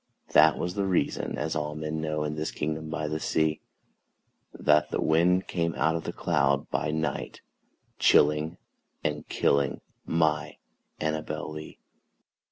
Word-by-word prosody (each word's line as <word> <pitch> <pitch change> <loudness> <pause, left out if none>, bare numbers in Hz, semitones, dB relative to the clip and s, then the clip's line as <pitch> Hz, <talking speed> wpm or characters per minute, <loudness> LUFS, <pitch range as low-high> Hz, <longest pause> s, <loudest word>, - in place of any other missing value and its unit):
that 80 +1 +6
was 90 0 -2
the 100 0 -1
reason 95 - 0
(as 80 - -2
all 75 -1 -2
men 75 +1 -3
know, 75 -1 -1
In 75 0 -2
this 80 +1 -3
kingdom 80 +1 -3
by 80 -1 -2
the 80 +1 -2
sea) 80 -1 0 0.9
That 75 0 +3
the - - -2
wind 90 +4 +3
came 85 -2 -1
out 80 +1 +2
of 80 - -4
the - - -2
cloud 70 -6 +1
by 80 - 0
night, 80 -2 -3 0.6
Chilling 75 +3 +4 0.5
and 75 0 -2
killing 70 -1 +1 0.2
my 80 -2 0 0.4
ANNABEL 75 0 -3
LEE. 75 0 -9
80 Hz, 145 wpm, -27 LUFS, 75-80 Hz, 0.9 s, that